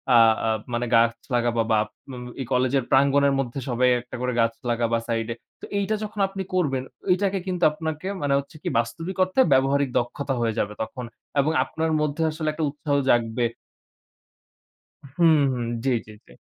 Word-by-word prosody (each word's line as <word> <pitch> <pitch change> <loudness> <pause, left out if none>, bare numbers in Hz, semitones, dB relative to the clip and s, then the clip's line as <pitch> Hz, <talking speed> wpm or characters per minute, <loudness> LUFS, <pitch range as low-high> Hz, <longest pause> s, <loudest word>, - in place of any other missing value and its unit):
আ - - +8 0.3
আ - - +2 0.2
মানে 120 +1 0
গাছ 115 0 +5 0.2
লাগাবা, 120 -1 +1
বা 110 - +4 0.3
ম - - -7 0.3
এই 130 - -3
কলেজের 130 +1 +2
প্রাঙ্গণের 140 +1 +4
মধ্যে 135 0 -2
সবাই 125 +1 +3
একটা 125 - -10
করে 125 0 -1
গাছ 115 0 +2 0.2
লাগাবা 115 -1 +1
সাইড 115 -1 -1
এ। - - -14 0.3
তো - - -7
এইটা 200 +2 0
যখন 210 0 -6
আপনি 195 0 -6
করবেন 140 -8 +1 0.3
এটাকে 195 +1 0
কিন্তু 180 -1 -2
আপনাকে 160 +3 -4
মানে 145 -1 +1
হচ্ছে 140 +4 -10
কি - - -1
বাস্তবিক 165 +11 -4
অর্থে 185 +8 +2
ব্যবহারিক 135 +1 +3
দক্ষতা 135 +3 -3
হয়ে 115 -2 +1
যাবে 105 0 -1
তখন। 125 +3 -5 0.3
এবং 150 +3 +3
আপনার 160 +4 -2
মধ্যে 150 +2 0
আসলে 155 0 -4
একটা 160 0 -3
উৎসাহ 145 0 -2
জাগবে 120 0 +2 1.7
হুম, 165 -2 +6 0.2
হুম, 120 -2 -2 0.2
জ্বী, 135 - +1
জ্বী, 110 - -12
জ্বী। - - -17
135 Hz, 175 wpm, -24 LUFS, 120-160 Hz, 1.7 s, আ